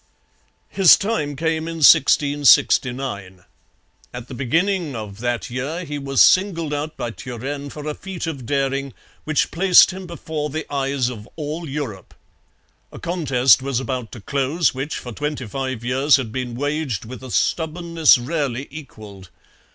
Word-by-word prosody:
His 195 -3 +6
time 195 -9 -2
came 160 +2 -1
in 165 - -5
1669. 130 -9 +3 0.7
At 125 0 -8
the 130 - -9
beginning 165 +5 0
of 105 -2 -7
that 120 0 -3
year 140 +8 -4
he 145 -2 -5
was 135 -1 +1
singled 170 -5 +2
out 150 +1 -4
by 120 - -4
Turenne 135 +4 -6
for 150 +1 -9
a 150 - -2
feat 185 +1 -6
of 140 -7 -6
daring 135 -1 -1 0.3
which 155 -1 0
placed 185 +2 +6
him 185 0 -8
before 160 -3 -5
the 155 +2 -4
eyes 135 -2 0
of 115 -2 -9
all 155 +1 -5
Europe. 135 -9 -6 0.8
A - - -11
contest 135 -8 +3
was 135 -2 -1
about 130 -3 -4
to 115 - -9
close 140 - 0
which 135 +4 -4
for 125 - -8
twenty 145 +1 -4
five 130 +1 -4
years 135 +4 +3
had 125 -5 -2
been 125 -1 -4
waged 145 - -2
with 130 +3 -9
a 130 - -8
stubbornness 165 +2 +2
rarely 135 0 -3
equalled. 105 - -11
140 Hz, 150 wpm, -21 LUFS, 125-155 Hz, 0.8 s, His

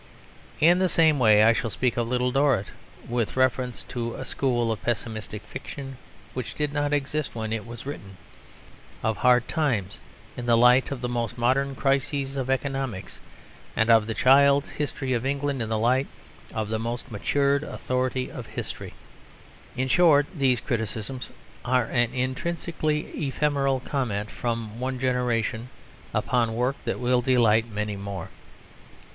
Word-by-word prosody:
In 175 +3 +5
the 185 -1 +2
same 160 -4 +4
way 110 -3 +6
I 115 +1 +6
shall 115 0 -1
speak 125 +2 0
of 120 -1 0
Little 125 +1 +1
Dorrit, 135 -6 +2 0.4
with 120 0 -2
reference 130 -1 +1
to 115 -1 -4
a 130 - -6
school 120 -5 0
of 110 - -3
pessimistic 110 -2 -3
fiction 135 0 -8 0.4
which 125 -3 -5
did 150 -1 -1
not 145 0 0
exist 145 0 -1
when 110 -1 -3
it 115 0 -4
was 120 +1 -8
written, 100 -9 -7 0.9
of 110 -1 0
Hard 125 -1 +4
Times 120 - -1 0.4
in 120 - -6
the 115 -1 +5
light 125 +2 +5
of 140 -3 -5
the 125 - -1
most 120 -1 -2
modern 135 +3 +1
crises 135 0 0
of 130 -1 -3
economics, 135 -7 -2 0.6
and 110 +1 +3
of 110 -2 +5
The 115 - -2
Child's 140 +2 +5
History 140 -3 -2
of 120 -1 0
England 140 -1 -1
in 110 - -3
the 110 - 0
light 125 +5 +2 0.4
of 110 -1 -3
the 110 0 -1
most 120 +3 -4
matured 140 +6 +1
authority 130 -3 -2
of - - -8
history. - - -7 0.8
In 130 +1 0
short, 150 -1 +5
these 135 -6 +2
criticisms 115 +2 -3 0.3
are 125 -1 +2
an 120 0 +1
intrinsically 150 +4 -1 0.3
ephemeral 140 -1 +1
comment 110 -8 -2
from 115 -2 -3
one 130 +1 -2
generation 125 -2 0 0.4
upon 115 -3 +1
work 125 +3 0
that - - -2
will 125 0 +2
delight 115 -3 +3
many 105 -1 -3
more. 100 -2 -6
125 Hz, 155 wpm, -26 LUFS, 115-135 Hz, 0.9 s, way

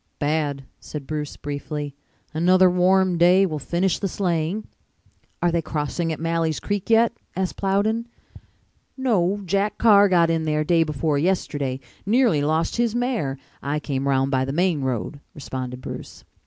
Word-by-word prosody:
"Bad," 145 -2 -1 0.2
said 150 -3 -7
Bruce 150 0 -4
briefly. 145 0 -5 0.4
"Another 180 +3 +4
warm 180 0 +3
day 180 +3 +6
will 155 -5 -3
finish 175 +4 0
the 200 - -1
sleighing." 180 +2 -1 0.8
"Are 175 - +3
they 170 0 +1
crossing 160 +2 -2
at 155 - -4
Malley's 165 -1 0
Creek 205 +1 -3
yet?" 230 +1 +4 0.2
asked 190 0 -2
Plowden. 210 +4 0 0.9
"No, 205 -7 +1
Jack 200 +3 0
Carr 205 -3 +6
got 170 -2 +4
in 165 -1 +1
there 155 0 +1
day 165 +2 +3
before 150 -1 0
yesterday. 145 -6 -1 0.2
Nearly 225 - +3
lost 155 +6 0
his 235 -1 +1
mare. 240 - -1 0.2
I 145 +2 -1
came 140 -2 -3
round 135 0 +2
by 130 -1 +2
the 135 - -3
main 170 -1 +1
road," 130 +3 -3 0.2
responded 130 -3 -6
Bruce. - - -8
165 Hz, 155 wpm, -23 LUFS, 145-190 Hz, 0.9 s, day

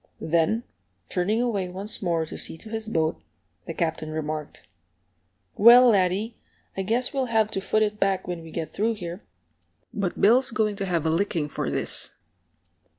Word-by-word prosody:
Then, 170 +8 +1 0.5
turning 210 +6 0
away 200 -7 -1
once 195 +4 -5
more 170 -4 0
to - - -9
see - - -3
to 220 - -11
his 220 0 -4
boat, 160 - -1 0.5
the 165 - -4
Captain 160 -1 -2
remarked, 155 -1 -5 0.9
"Well, 240 +4 +8
laddie, 200 +2 +1 0.4
I 195 - -2
guess 230 +6 0
we'll 270 -2 0
have 220 -3 +1
to 195 - -1
foot 215 +2 +1
it 210 0 -2
back 195 -1 0
when 175 -2 -4
we 165 - -11
get 160 0 -5
through 225 +3 0
here. 175 0 -7 0.7
But 200 -5 -2
Bill's 255 +5 +5
going 220 -3 0
to 195 - -3
have 170 -3 0
a 160 - +2
licking 165 -3 0
for - - -3
this!" - - -1
195 Hz, 170 wpm, -25 LUFS, 165-220 Hz, 0.9 s, Well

